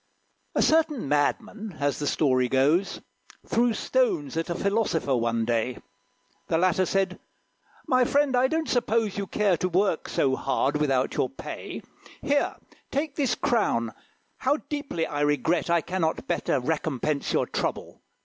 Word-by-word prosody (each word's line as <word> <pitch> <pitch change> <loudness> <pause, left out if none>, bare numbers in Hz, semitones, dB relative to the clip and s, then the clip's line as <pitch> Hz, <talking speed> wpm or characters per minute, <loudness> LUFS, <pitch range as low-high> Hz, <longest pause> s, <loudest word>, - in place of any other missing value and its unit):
A - - +3
Certain 310 - +2
Madman, 205 - -1
as 145 -1 0
the 145 - -2
story 130 -4 +2
goes, 150 +9 +2 0.4
Threw 235 +1 +2
stones 375 - 0
at 165 +2 -2
a 170 - -1
Philosopher, 195 -8 0
one 115 -1 0
day. 120 +1 0 0.7
The 160 - +1
latter 185 +1 +2
said, 195 -1 0 0.7
"My 255 -1 +3
friend, 280 +1 +2
I 250 +1 +4
don't 320 +3 -1
suppose 225 -4 0
You 200 - -3
care 200 -2 +2
to 185 - -1
work 185 -1 +1
so 135 -2 +1
hard, 135 +2 0
without 135 -3 +1
your - - +1
pay. - - -7 0.4
Here, 285 0 +1 0.3
take 285 +1 -2
this 275 -5 +1
crown; 115 - 0 0.4
how 275 +3 +1
deeply 285 - -2
I 145 0 -3
regret 150 +4 +1
I 170 -1 +3
cannot 170 -2 -2
better 140 - 0
recompense 150 0 -1
your - - +2
trouble! - - -4
180 Hz, 150 wpm, -26 LUFS, 145-245 Hz, 0.7 s, I